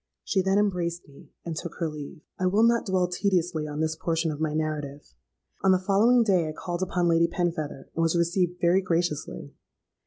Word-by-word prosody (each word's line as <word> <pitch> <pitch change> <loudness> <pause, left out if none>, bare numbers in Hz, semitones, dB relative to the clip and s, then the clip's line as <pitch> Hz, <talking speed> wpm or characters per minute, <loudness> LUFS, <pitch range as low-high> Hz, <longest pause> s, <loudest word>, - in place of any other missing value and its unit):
She 190 - +1
then 190 +1 +1
embraced 175 -4 -1
me, 140 -1 -17 0.2
and 165 -2 -4
took 170 +1 -6
her 165 - -2
leave. 150 +1 -8 0.2
"I 185 - +1
will 205 +4 +3
not 235 -1 +3
dwell 185 -2 +2
tediously 175 -4 0
on 150 +1 -4
this 160 0 0
portion 165 0 -1
of 150 0 -6
my 155 -1 0
narrative. 150 - -4 0.5
On 190 - +5
the 185 - +5
following 210 +6 +4
day 185 -7 +2
I - - -5
called 175 +2 -5
upon 180 -1 0
Lady 170 0 +4
Penfeather, 165 -5 -3
and 165 - -1
was 165 +1 +2
received 175 +1 0
very 175 +2 +3
graciously. 165 -4 -2
170 Hz, 195 wpm, -26 LUFS, 155-185 Hz, 0.5 s, On